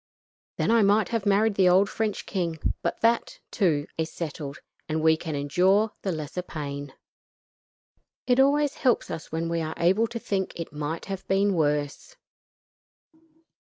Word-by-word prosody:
Then - - +1
I 230 -1 +5
might 205 +1 +3
have 225 -4 -1
married 205 +2 +3
the 190 -2 +4
old 190 +3 +5
French 215 -1 -2
king, 170 -4 -2 0.2
but 170 - -3
that, 230 0 +1
too, 160 -8 +1
is 160 +1 -1
settled; 150 -3 -5 0.3
and 155 +1 0
we 160 0 +5
can 160 -1 -5
endure 185 +9 +2
the 195 - -1
lesser 155 +2 -4
pain. 145 -5 -6 1.3
It 250 0 +3
always 285 +1 +3
helps 250 -3 +1
us 160 - -7
when 165 +1 -2
we 165 0 -1
are 160 0 -4
able 190 +7 +3
to 235 +1 -5
think 195 -4 -2
it 165 -2 -6
might 150 +2 -4
have 195 -2 -6
been 195 +1 +2
worse." 150 - -1
180 Hz, 160 wpm, -26 LUFS, 160-210 Hz, 1.3 s, I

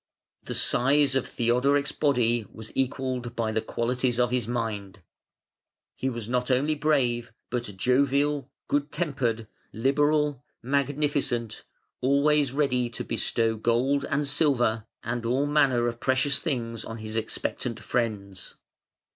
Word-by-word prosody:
The - - -5
size 140 +2 +3
of 135 -1 0
Theodoric's 130 +4 +2
body 120 -6 +1
was 110 -1 -10
equalled 130 -2 -2
by 115 -1 0
the 110 0 0
qualities 125 +2 -1
of 120 -1 +2
his 125 -3 0
mind. 105 -5 -3 0.9
He 130 - -1
was 120 -4 -5
not 125 +1 0
only 135 +4 +2
brave 130 -6 +1 0.2
but 120 -1 -1
jovial, 140 +5 +2 0.2
good 145 0 0
tempered, 130 -9 -1 0.2
liberal, 145 +2 +1 0.2
magnificent, 140 -3 0 0.4
always 140 +1 +3
ready 125 -4 +1
to 115 - -6
bestow 115 -1 0
gold 125 +5 +1
and 145 +1 0
silver 125 -7 +1 0.2
and 120 +1 -3
all 125 +5 +1
manner 140 -5 +3
of 120 0 -3
precious 135 +2 +2
things 115 -8 -3
on 115 - -7
his 110 0 -7
expectant 115 +1 -3
friends. 105 -6 -3
125 Hz, 130 wpm, -27 LUFS, 115-140 Hz, 0.9 s, size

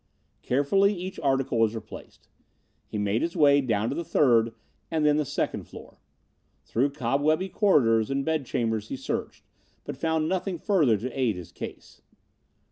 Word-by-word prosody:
Carefully 195 +10 +2
each 185 +1 -6
article 135 -4 0
was 115 0 +2
replaced. 110 - -10 0.6
He - - -5
made 105 +2 0
his 170 +2 -2
way 145 -3 +5
down 115 -3 0
to - - -3
the 170 - -3
third 115 -7 +3 0.3
and 160 -2 0
then 150 0 +4
the 150 - 0
second - - -2
floor. - - -13 0.6
Through 135 +5 0
cobwebby 150 +7 0
corridors 115 - +3
and 135 0 -1
bedchambers 120 -8 -1
he - - -4
searched, 130 - -4 0.4
but - - -6
found 160 +2 0
nothing 185 +1 -2
further 155 - +2
to 125 +6 -5
aid 120 -6 +1
his 90 -3 -9
case. - - -9
140 Hz, 155 wpm, -26 LUFS, 115-160 Hz, 0.6 s, way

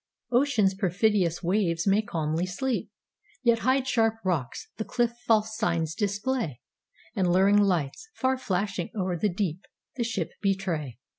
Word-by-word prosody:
Ocean's 240 -6 +3
perfidious 190 -2 +1
waves 175 -2 +1
may 200 +2 +4
calmly 165 -3 -2
sleep, 240 +8 -2 0.5
Yet 235 -2 +4
hide 260 +2 +2
sharp 225 -4 +2
rocks—the 175 - -3
cliff 240 -1 0
false 220 -1 +3
signs 170 -7 0
display:And 200 - -3
luring 195 +3 +5
lights, 185 - 0
far 260 0 0
flashing 195 -4 -2
o'er 185 -3 -1
the 205 +5 +1
deep, 180 -2 -2 0.4
The 240 - +1
ship 205 -7 -2
betray. 180 - -1
195 Hz, 130 wpm, -27 LUFS, 175-225 Hz, 0.5 s, luring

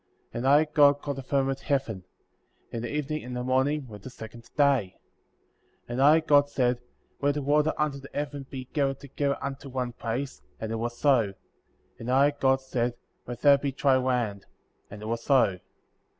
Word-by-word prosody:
8. - - -5
And 130 - -1
I, 145 +3 +6
God, 145 -2 +4
called 140 -1 -4
the - - -4
firmament 135 0 0
Heaven; 135 -11 -2 0.7
and 115 - -4
the 120 - -4
evening 150 +1 -2
and 125 0 -6
the 125 - -2
morning 135 +3 +1
were 105 -3 -10
the 115 - -9
second 115 -1 -11
day. 135 -10 +2 0.9
9. - - -29
And 120 +2 -1
I, 150 +4 +6
God, 145 -2 +4
said: 125 -3 0 0.4
Let 145 0 +2
the 145 - -2
water 150 +2 +3
under 150 -2 -1
the 140 - -12
heaven 145 -2 -4
be 130 -2 -6
gathered 135 -2 0
together 140 0 -2
unto 140 0 -5
one 125 -1 -2
place, 120 - -4 0.2
and 110 0 -4
it 115 - -1
was 120 +1 -3
so; 120 -9 +2 0.6
and 115 - -6
I, 135 +3 +4
God, 135 -2 +2
said: 125 -2 -2 0.3
Let 120 -1 -6
there 140 -1 +6
be 140 0 -2
dry 135 -1 +3
land; 120 -6 -1 0.4
and 105 +1 -9
it - - -6
was 115 +1 -2
so. 120 -10 +3
135 Hz, 195 wpm, -27 LUFS, 120-145 Hz, 0.9 s, I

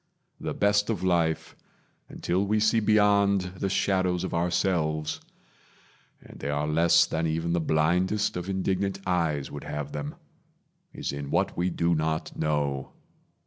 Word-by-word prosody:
The - - -4
best 105 +1 +2
of 100 -5 -2
life, 85 -3 0 0.5
until 90 +3 -1
we 105 +2 +1
see 110 +2 +3
beyond 100 -2 +4 0.2
The 95 - -1
shadows 95 -2 +1
of 95 - -4
ourselves 85 -3 0 1.0
(and - - -14
they - - -4
are 75 +1 -1
less 80 +2 +4
Than 80 +1 -1
even 80 +2 -1
the 85 - +2
blindest 90 +7 +1
of 90 +1 -4
indignant 95 0 -1
eyes 80 -6 0
Would 75 - -7
have 75 -1 -4
them) 75 0 -5 0.8
is - - -4
in 70 0 -5
what - - 0
we 90 +1 0
do 85 0 +1
not 80 0 -1
know. 70 -3 -1
85 Hz, 145 wpm, -27 LUFS, 75-95 Hz, 1.0 s, beyond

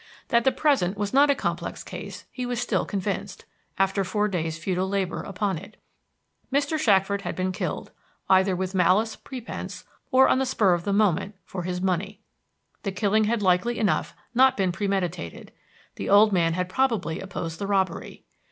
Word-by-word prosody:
That 235 0 +3
the 265 - +5
present 260 - +1
was 205 +1 -2
not 285 +2 +6
a 280 - +4
complex - - -3
case - - -8
he 255 - -5
was 245 -1 -2
still 245 - 0
convinced, 195 -1 -4 0.3
after 195 +1 +2
four 210 +3 0
days' 165 -5 -2
futile 185 +2 -1
labor 195 -2 -1
upon 195 -3 -2
it. 200 +4 -14 0.7
Mr. 285 +3 +1
Shackford 200 -5 +3
had - - -4
been 185 0 -1
killed 185 - -4 0.4
either 190 0 +4
with 185 +1 -3
malice 190 +5 +3
prepense 250 -3 -7 0.3
or 265 -1 +6
on - - +3
the 265 - +1
spur 210 -7 +3
of 175 0 -2
the 200 - 0
moment 195 +2 -1
for 185 - -5
his 180 0 -3
money. 190 +2 -1 0.6
The 200 - -2
killing 210 +2 +2
had 220 0 0
likely 190 +6 +2
enough 210 - 0 0.2
not 260 +2 +5
been 190 -3 +1
premeditated; 180 - -3 0.5
the - - -4
old 210 +2 +6
man 165 -3 +2
had 180 +1 -1
probably 220 -6 0
opposed 165 -4 -5
the 200 - -3
robbery. 190 -3 -1
195 Hz, 175 wpm, -25 LUFS, 185-220 Hz, 0.7 s, not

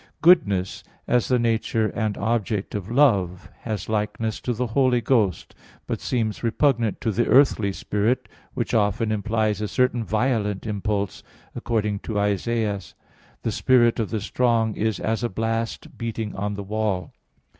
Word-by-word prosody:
"Goodness," 100 - +4 0.2
as 125 -1 +2
the 125 - +3
nature 115 -1 +1
and 110 -2 -2
object 105 -2 -1
of 100 -1 -4
love, 100 -9 +2
has 110 -3 -4
likeness 110 +1 -2
to 125 - -2
the 120 +2 -1
Holy 125 +1 +2
Ghost; 110 -8 +1 0.3
but - - -3
seems 110 -4 -1
repugnant 115 -2 +1
to 115 - 0
the 120 +4 0
earthly 125 -7 +4
spirit, 105 +5 -1 0.3
which - - -2
often 110 +1 +1
implies 110 0 0
a 105 - -1
certain 125 0 +1
violent 110 -3 0
impulse, 105 -1 -2 0.3
according 105 -3 -1
to 105 -1 -3
Isa. 100 +2 0
25:4: 105 -6 -2 0.5
"The - - 0
spirit 120 -2 +3
of 110 - -1
the 110 -2 -2
strong 115 0 +1
is 110 -1 -1
as 110 +2 -1
a 120 - 0
blast 115 +3 -3
beating 115 -2 -4
on 105 +1 -2
the 100 - -5
wall." 100 -4 -2
110 Hz, 155 wpm, -24 LUFS, 105-120 Hz, 0.5 s, Goodness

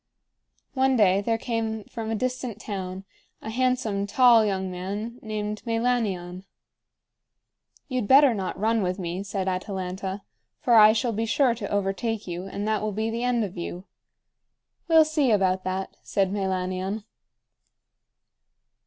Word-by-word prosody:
One 265 -1 +2
day 200 -4 +4
there 225 +2 0
came 225 -2 -3
from 220 +2 -6
a 225 - 0
distant 250 -1 -3
town 190 -3 -5 0.3
a 220 - -6
handsome, 245 -5 0
tall 235 +1 +6
young 190 -3 -1
man 205 +7 -5
named 210 -1 -4
Meilanion. 225 -7 -1 1.4
"You'd 255 -6 -2
better 275 0 +7
not 190 -3 -4
run 225 +2 +2
with 180 0 -1
me," 180 0 -4
said 195 -1 -3
Atalanta, 190 +1 -3 0.4
"for 240 - +1
I 215 -1 +9
shall 230 +1 0
be 225 +2 -1
sure 255 +1 +3
to 220 -4 -6
overtake 205 +2 -1
you, 180 +1 -5
and 200 +2 -4
that 215 -1 +1
will 215 0 -1
be 220 +2 -1
the 235 +1 -3
end 245 -2 +1
of 195 -3 -5
you." 175 +2 -6 1.0
"We'll 325 -2 +6
see 305 -4 +1
about 190 -3 +2
that," 190 +1 -3
said 195 -2 0
Meilanion. 190 +1 -2
210 Hz, 145 wpm, -25 LUFS, 190-230 Hz, 1.4 s, I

